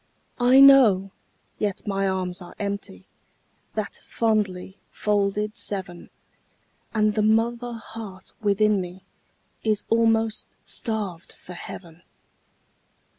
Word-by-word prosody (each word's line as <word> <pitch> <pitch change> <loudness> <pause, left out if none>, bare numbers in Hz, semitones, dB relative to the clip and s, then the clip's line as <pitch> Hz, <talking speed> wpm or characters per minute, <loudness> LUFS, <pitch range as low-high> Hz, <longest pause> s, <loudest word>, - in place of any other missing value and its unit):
I 250 +2 +6
know, 235 -9 +7 0.5
yet 205 -3 -2
my 195 -1 0
arms 185 -1 -2
are 175 - -11
empty, 200 - -5 0.7
That 215 -2 -4
fondly 205 -4 -1
folded 210 0 0
seven, 185 -3 -4 0.8
And 215 -1 +2
the 215 - +1
mother 235 +3 +1
heart 220 -4 -9
within 210 -1 +3
me 180 +1 -9 0.6
Is 215 -2 0
almost 225 -1 +2 0.2
starved 205 -7 -3
for 180 - -12
heaven. 175 -1 -10
210 Hz, 100 wpm, -24 LUFS, 190-225 Hz, 0.8 s, know